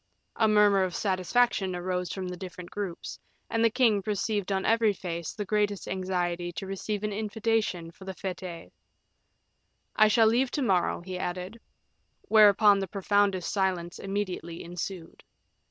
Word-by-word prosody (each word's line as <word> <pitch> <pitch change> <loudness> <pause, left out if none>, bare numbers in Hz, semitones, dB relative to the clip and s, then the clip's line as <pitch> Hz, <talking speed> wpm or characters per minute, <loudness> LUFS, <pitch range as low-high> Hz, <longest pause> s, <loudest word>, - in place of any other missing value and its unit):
A 220 - +3
murmur 210 -2 +5
of 185 -2 -2
satisfaction 190 0 +1
arose 180 0 -2
from 190 -1 -4
the 180 - -5
different 180 -1 -9
groups, 195 -5 -5 0.3
and 225 0 +1
the 230 - +5
king 225 -4 +3
perceived 205 0 -2
on 190 0 0
every 225 -2 +3
face 170 -3 -5
the 210 - -4
greatest 205 -1 0
anxiety 175 -2 -2
to 195 - -5
receive 195 +2 -4
an 210 -1 -1
invitation 215 -5 -1
for 190 - -14
the 190 -1 -6
fetes. 180 -3 -6 1.2
"I 215 - +6
shall 225 +1 +4
leave 240 +4 +3
to 285 - 0
morrow," 185 -8 +1
he 180 +1 -6
added. 180 +6 -5 0.6
Whereupon 210 -1 +6
the 195 - -2
profoundest 200 -2 +1
silence 185 -3 -1
immediately 190 -4 -4
ensued. 175 0 -7
195 Hz, 150 wpm, -28 LUFS, 180-210 Hz, 1.2 s, I